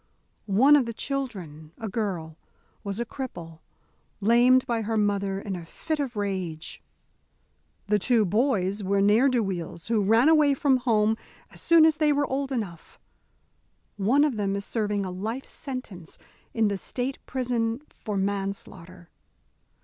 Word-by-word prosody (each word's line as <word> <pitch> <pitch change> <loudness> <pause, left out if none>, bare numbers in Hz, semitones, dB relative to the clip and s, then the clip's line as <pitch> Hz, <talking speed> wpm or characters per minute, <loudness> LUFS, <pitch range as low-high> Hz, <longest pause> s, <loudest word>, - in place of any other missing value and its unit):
One 250 +9 +6
of 270 -5 +3
the 230 - -5
children, 185 - -5
a 225 - -5
girl, 185 -7 -3 0.5
was 200 +1 -4
a 235 - -1
cripple, 175 - -7 0.6
lamed 240 +4 +5
by 235 -2 -1
her 220 +1 -1
mother 200 -2 0
in 195 -1 -5
a 175 - -7
fit 310 - -4
of 265 -4 -3
rage. 185 -6 -4 1.0
The 210 0 +2
two 225 +1 +3
boys 205 -2 +1
were 200 +1 +1
ne'er 210 +7 +4
do 245 -3 +1
weels 175 -1 -5
who 220 -3 +2
ran 225 +7 +4
away 305 -3 +5
from 270 -1 +3
home 220 -3 +2 0.3
as - - -9
soon 335 -2 +6
as 315 -1 +3
they 305 -1 +3
were 290 0 +2
old 275 0 -2
enough. 200 -10 -5 1.0
One 230 +9 +3
of 285 -7 0
them 200 -1 0
is 200 0 -4
serving 210 -3 -1
a 185 - -4
life 220 +8 -4
sentence 235 - -8 0.3
in 225 -2 +2
the 200 -1 -1
State 255 +6 -4
prison 245 -1 -1
for 210 -2 -5
manslaughter. 190 -3 -4
215 Hz, 155 wpm, -26 LUFS, 195-255 Hz, 1.0 s, One